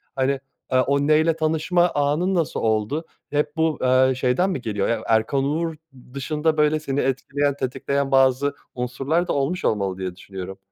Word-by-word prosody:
Hani, 135 +1 +1 0.3
aaa, 130 -1 +3
o 140 +1 +1
neyle 155 +1 +4
tanışma 160 +3 +2
anın 150 +6 +1
nasıl 165 -4 0
oldu? 110 +8 0 0.2
Hep 150 0 -1
bu, 160 -1 +1
aaa, 130 0 +4
şeyden 130 +9 +1
mi 160 -9 -3
geliyor? 105 -5 -1
Ya 115 -2 0
Erkan 115 +5 +2
Oğur 160 +3 -1 0.4
dışında 155 +3 -1
böyle 150 0 +3
seni 140 -2 -2
etkileyen, 140 +2 0
tetikleyen 135 +1 -2
bazı 135 +1 +3 0.2
unsurlar 135 +8 -1
da - - 0
olmuş 145 +7 -1
olmalı 100 -3 0
diye 95 -2 -4
düşünüyorum. 95 0 -8
140 Hz, 160 wpm, -23 LUFS, 125-155 Hz, 0.4 s, neyle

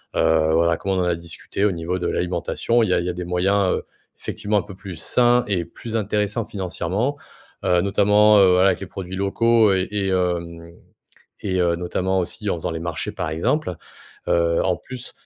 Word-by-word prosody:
heu, 80 -1 +3
voilà, 85 +1 +3
comment 95 -1 -2
on 90 - +1
a 90 - +2
discuté 85 +4 -4
au 105 - +3
niveau 90 +2 -3
de 85 - -2
l'alimentation, 90 +6 0
il 110 - 0
y 90 - +3
a - - +3
il 85 - -3
y - - -1
a - - -2
des 90 0 -5
moyens, 95 +2 +1
heu, - - -5 0.3
effectivement 105 0 -2
un - - +1
peu 100 -2 -11
plus 95 -2 -9
sains 120 +7 +3
et 90 -4 -1
plus 115 +7 -8
intéressants 105 +1 -1
financièrement, 95 - -2 0.5
heu, 90 -1 +3
notamment, 105 +2 +4
heu, 95 -2 +6
voilà, 90 +2 +5
avec 90 - 0
les 95 - -6
produits 95 -1 -7
locaux 110 +2 +3
et 95 0 0
et, 100 -2 -1
hem, 85 -2 -2 0.7
et, 95 -2 -1
heu, 85 -1 +2
notamment 95 +2 -1
aussi 100 +3 -3
en - - 0
faisant 85 +1 -4
les 80 - -4
marchés 85 -1 -3
par - - -3
exemple. 110 - -1 0.5
Heu, 85 -1 +2
en 90 -2 +1
plus, 130 -1 -9
95 Hz, 205 wpm, -22 LUFS, 85-105 Hz, 0.7 s, heu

